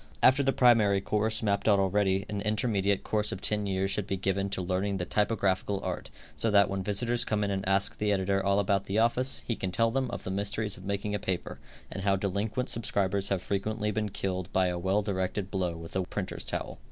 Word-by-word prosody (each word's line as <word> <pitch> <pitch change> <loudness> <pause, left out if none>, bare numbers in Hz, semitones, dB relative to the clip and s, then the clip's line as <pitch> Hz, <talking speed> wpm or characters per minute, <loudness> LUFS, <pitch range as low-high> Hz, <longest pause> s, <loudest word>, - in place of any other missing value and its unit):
After 130 +2 +6
the 135 -1 +2
primary 115 -7 +4
course, 110 +3 0
mapped 100 -1 0
out 105 -2 +6
already, 95 0 +1
an 105 -1 -3
intermediate 105 -2 +1
course 105 -1 0
of 95 - -4
ten 105 0 0
years 95 0 0
should 105 -1 -2
be 95 - -1
given 95 +1 -1
to 95 - -3
learning 95 +2 -1
the 90 - -2
typographical 100 -1 0
art, - - -4 0.3
so 115 - 0
that 100 -2 +4
when 100 0 -2
visitors 115 +4 +1
come 105 -1 0
in 100 - -1
and 95 0 -2
ask 95 0 0
the 105 0 +1
editor 95 0 +1
all 100 0 +2
about 100 -1 +1
the 100 - -2
office, 120 +3 +2
he 115 - -1
can 95 -3 -3
tell 115 +4 +2
them 130 0 0
of 120 - -5
the 95 - -4
mysteries 100 +2 -2
of 90 - -12
making 100 +1 -2
a 105 - -1
paper, 95 -2 -3 0.3
and - - -5
how 100 0 +2
delinquent 100 +5 -2
subscribers 100 -3 0
have 95 -2 -1
frequently 105 +2 -1
been 105 0 -1
killed 95 -1 -3
by 95 -1 +2
a 90 0 -3
well 95 +4 +1
directed 95 0 -2
blow 90 -4 -1
with 80 +2 -9
a 95 - +2
printer's - - -4
towel. - - -4
100 Hz, 225 wpm, -29 LUFS, 95-105 Hz, 0.3 s, After